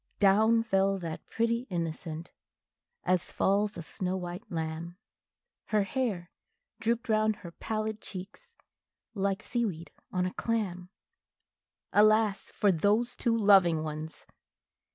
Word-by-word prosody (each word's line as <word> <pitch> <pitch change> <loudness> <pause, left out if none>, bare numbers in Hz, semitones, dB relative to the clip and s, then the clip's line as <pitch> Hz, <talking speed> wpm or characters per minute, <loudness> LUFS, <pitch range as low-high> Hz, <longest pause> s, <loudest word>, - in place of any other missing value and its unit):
Down 220 +3 +5
fell 195 -2 +2
that 165 -4 -6
pretty 230 +2 0
innocent, 165 -1 -4 0.7
as 180 -1 +1
falls 205 +1 +1
a 170 - -5
snow 185 +3 -3
white 180 +3 -7
lamb, 165 +1 -4 0.7
Her 210 -2 +2
hair 200 -6 -2 0.5
drooped 235 +2 0
round 215 -1 +3
her 175 -5 -10
pallid 215 +3 -3
cheeks, 215 - -10 0.6
like 200 -1 -1
sea 240 -1 -1
weed 170 -6 -4 0.2
on 180 0 0
a 185 - -3
clam. 190 -6 -2 1.0
Alas 215 -1 +4
for 205 - +4
those 210 +8 +2
two 230 -1 +1
loving 190 -7 +5
ones! 155 +1 -6
195 Hz, 120 wpm, -30 LUFS, 175-220 Hz, 1.0 s, Down